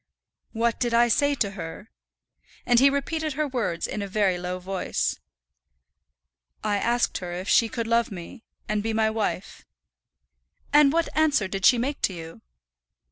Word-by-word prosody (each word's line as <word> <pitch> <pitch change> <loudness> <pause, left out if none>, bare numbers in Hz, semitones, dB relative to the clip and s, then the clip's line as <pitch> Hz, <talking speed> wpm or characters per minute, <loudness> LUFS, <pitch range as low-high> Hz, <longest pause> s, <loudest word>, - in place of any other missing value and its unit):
"What 230 0 0
did 240 -2 0
I 240 0 +5
say 285 +5 +2
to 205 -7 -1
her?" 170 +2 -8 0.7
and 240 -1 +4
he 275 +2 +6
repeated 310 +2 -2
her 305 +2 -1
words 235 -10 -2
in 210 - -4
a 200 - -3
very 195 -2 +1
low 180 +1 -3
voice. 185 +1 -2 1.4
"I 205 -1 +1
asked 240 +4 0
her 175 -1 -6
if 180 +2 -5
she 230 - +4
could 230 0 -3
love 230 0 +2
me, 195 +5 -9 0.2
and 215 -1 0
be 225 +1 -2
my 220 0 +2
wife." 215 -3 -3 1.1
"And 295 -1 +6
what 335 +1 -1
answer 295 -10 +2
did 195 0 +2
she 250 - +6
make 270 +5 -2
to 190 - +1
you?" 165 -7 -9
225 Hz, 165 wpm, -25 LUFS, 195-255 Hz, 1.4 s, he